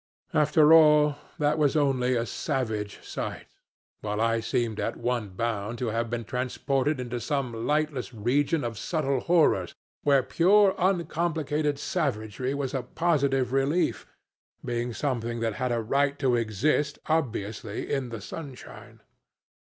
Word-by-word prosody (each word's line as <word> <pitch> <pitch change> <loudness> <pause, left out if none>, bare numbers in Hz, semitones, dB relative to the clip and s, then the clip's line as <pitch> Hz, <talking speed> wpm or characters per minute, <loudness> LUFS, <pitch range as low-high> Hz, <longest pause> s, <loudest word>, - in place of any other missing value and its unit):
After 150 +1 +5
all, 150 -2 +6 0.2
that 150 +1 +1
was 150 0 +2
only 130 -4 +2
a 115 -1 0
savage 110 -7 -3
sight, - - -5 0.5
while 105 0 -3
I 115 0 +2
seemed 115 -1 -1
at - - -2
one 120 -4 -2
bound 110 +2 -3
to 120 -1 -2
have 115 +1 -1
been 120 0 -3
transported 130 +4 -1
into 120 -1 -4
some 125 -4 -2
lightless 150 -4 0
region 135 +7 0
of 115 -3 -4
subtle 140 -6 0
horrors, 170 +2 +2 0.3
where 140 -2 +4
pure, 195 +6 +4
uncomplicated 160 -5 0
savagery 130 - -2
was 140 -2 -3
a 135 - -1
positive 135 -2 0
relief, 140 +6 +1 0.6
being 120 0 -2
something 120 -2 -2
that 115 -1 0
had 125 -1 0
a 120 -1 0
right 140 +5 +1
to 130 -3 +2
exist 125 +7 0
obviously 115 -9 -2
in 135 -3 -1
the 115 -3 -6
sunshine. 140 -1 -10
135 Hz, 135 wpm, -27 LUFS, 115-150 Hz, 0.6 s, all